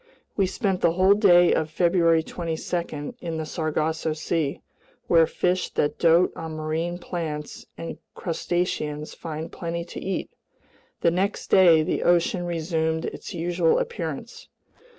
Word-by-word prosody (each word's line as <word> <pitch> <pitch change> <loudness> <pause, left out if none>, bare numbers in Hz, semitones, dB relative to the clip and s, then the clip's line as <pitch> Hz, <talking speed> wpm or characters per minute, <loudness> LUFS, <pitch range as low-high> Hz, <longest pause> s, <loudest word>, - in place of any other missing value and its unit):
We 195 -2 +2
spent 190 -2 -1
the 165 - +3
whole 185 +3 +5
day 175 -4 +5
of 160 -1 0
February 170 -1 +3
22 165 -1 -4
in 165 -2 -4
the 160 - -3
Sargasso 160 0 -1
Sea, 155 -2 -2 0.4
where 165 -2 +5
fish 180 +1 0
that 145 - 0
dote 170 +2 +4
on 160 -1 -6
marine 160 +3 -2
plants 160 -4 -5
and 165 - -6 0.2
crustaceans 160 -3 -2
find 160 -1 -6
plenty 170 0 -4
to - - -8
eat. 190 -1 -3 0.7
The 170 - +4
next 190 +4 -2
day 170 -5 +7
the - - -1
ocean 175 +1 +2
resumed 160 -1 -1
its - - -6
usual 170 0 +2
appearance. 475 -1 -5
170 Hz, 135 wpm, -25 LUFS, 160-180 Hz, 0.7 s, day